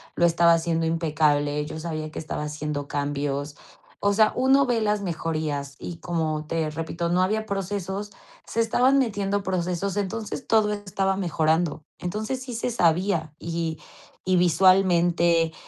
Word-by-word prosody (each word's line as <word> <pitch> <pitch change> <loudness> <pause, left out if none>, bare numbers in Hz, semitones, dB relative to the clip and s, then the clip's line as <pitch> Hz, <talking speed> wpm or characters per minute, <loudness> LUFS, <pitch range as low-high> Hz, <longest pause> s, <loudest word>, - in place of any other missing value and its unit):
lo 170 - +3
estaba 170 0 +5
haciendo 165 0 0
impecable, 150 -3 +1
yo 155 +1 -6
sabía 155 -1 -4
que - - -6
estaba 155 -1 -4
haciendo 150 -1 -4
cambios. 145 0 -2 0.4
O 200 0 +2
sea, 215 +1 +4
uno 265 +2 +4
ve 240 -3 +1
las 210 -1 +1
mejorías 155 -5 -3
y, 170 - -6
como 160 -3 -2
te 160 -1 -1
repito, 165 +2 -3
no 180 +1 +3
había 215 +3 0
procesos, 200 0 -3 0.3
se 230 - -4
estaban 250 +4 +3
metiendo 205 -5 0
procesos, 185 +1 -2
entonces 215 +4 -3
todo 215 -2 +3
estaba 195 -1 -1
mejorando. 160 -3 0 0.2
Entonces, 215 +8 -3
sí 255 -2 -7
se 235 +2 -2
sabía, 170 -5 +1
y 165 -1 -3 0.5
y 185 - +4
visualmente, 175 -2 +4
170 Hz, 145 wpm, -25 LUFS, 155-200 Hz, 0.5 s, estaba